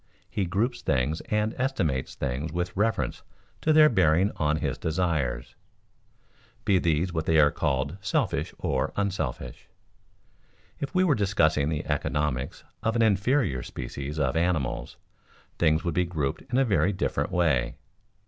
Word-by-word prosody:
He 100 - -2
groups 110 +8 -1
things 70 +6 0
and 105 +1 +1
estimates 90 - -1
things 70 +4 -3
with 90 +2 -3
reference 110 +3 0 0.4
to 155 - +2
their 155 0 +7
bearing 95 - +3
on 75 0 +1
his 75 - -2
desires, 80 -8 -1 1.1
be 95 -2 +4
these 85 +1 0
what 80 0 -2
are 75 -3 +5
called 70 +7 -1
selfish 95 - 0
or 65 0 -1
unselfish. 95 -10 -3 1.1
If 140 +5 -5
we 185 - +4
were 175 -5 +4
discussing 90 - +2
the 75 -2 -2
economics 70 -3 -2 0.2
of 115 +1 0
an 115 - +3
inferior 100 - +2
species 70 +5 -6
of 70 -4 0
animals, 80 -7 -1 0.6
things 80 -1 +3
would 85 - -1
be 90 +2 +2
grouped 75 -6 -2
in 125 - +2
a 135 - +4
very 100 -3 +2
different 95 - -1
way. 75 -9 +1
85 Hz, 140 wpm, -27 LUFS, 75-100 Hz, 1.1 s, their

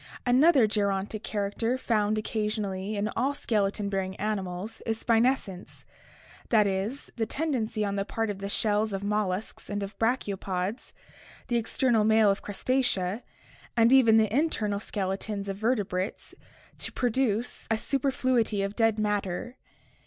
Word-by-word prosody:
— - - -28
Another 275 -3 +6
gerontic 205 0 -1
character 215 +4 -1
found 215 -4 +1
occasionally 210 -2 -2
in 205 +1 0
all 270 +6 0
skeleton 205 -5 0
bearing 190 -1 -2
animals 200 0 -4
is 225 -1 -2
spinescence, 230 -5 0 0.7
that 215 -3 +5
is, 200 +8 -2
the 225 -1 0
tendency 235 -7 -1
on 200 0 -2
the 195 - +1
part 225 +1 -2
of 195 - -7
the 200 0 -4
shells 210 0 0
of 195 0 -3
molluscs 205 -1 -2
and 205 0 -2
of 200 +1 -7
brachiopods, 200 -3 -1 0.6
the 240 - +2
external 230 0 +2
mail 220 -1 +5
of 195 - -2
Crustacea, 210 -3 0 0.6
and 230 +2 +5
even 230 -4 +7
the 220 0 +2
internal 220 -9 +1
skeletons 200 0 -3
of 195 -1 -3
vertebrates 205 -4 -1 0.5
to - - -4
produce 245 -2 -1
a 225 - +2
superfluity 255 -5 +1
of 200 +1 -3
dead 225 -2 +2
matter. 210 +2 -2
215 Hz, 140 wpm, -28 LUFS, 200-230 Hz, 0.7 s, even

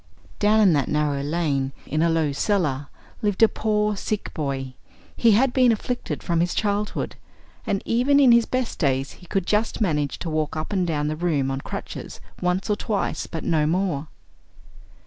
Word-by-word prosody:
"Down 215 +1 +4
in 195 -5 +5
that 140 -3 +1
narrow 150 -2 0
lane, 140 -3 -1
in 155 - -1
a 170 - +3
low 160 -3 +1
cellar, 145 -4 0 0.3
lived 205 0 +1
a - - +9
poor 210 -1 0
sick 210 +1 -3
boy; 135 -4 -3 0.4
he 230 -2 +4
had 245 +4 +3
been 255 -2 +5
afflicted 240 +3 -3
from 170 -2 0
his 175 +1 0
childhood, 205 0 -1 0.5
and 195 - 0
even 260 +5 +3
in 265 -4 +7
his 235 -1 +5
best 255 -2 -2
days 135 -3 +1
he 180 - -15
could 190 +1 -1
just 210 +3 0
manage 150 -9 0
to 170 - -5
walk 155 -1 -1
up 155 +6 -4
and 185 -3 +1
down 150 -2 -1
the 155 - -1
room 155 -5 0
on 135 0 -3
crutches - - -7 0.2
once 180 +1 0
or 210 - +2
twice, 210 -1 -2
but 160 - -5
no 155 -2 +2
more. 165 -3 0
175 Hz, 185 wpm, -24 LUFS, 150-210 Hz, 0.5 s, a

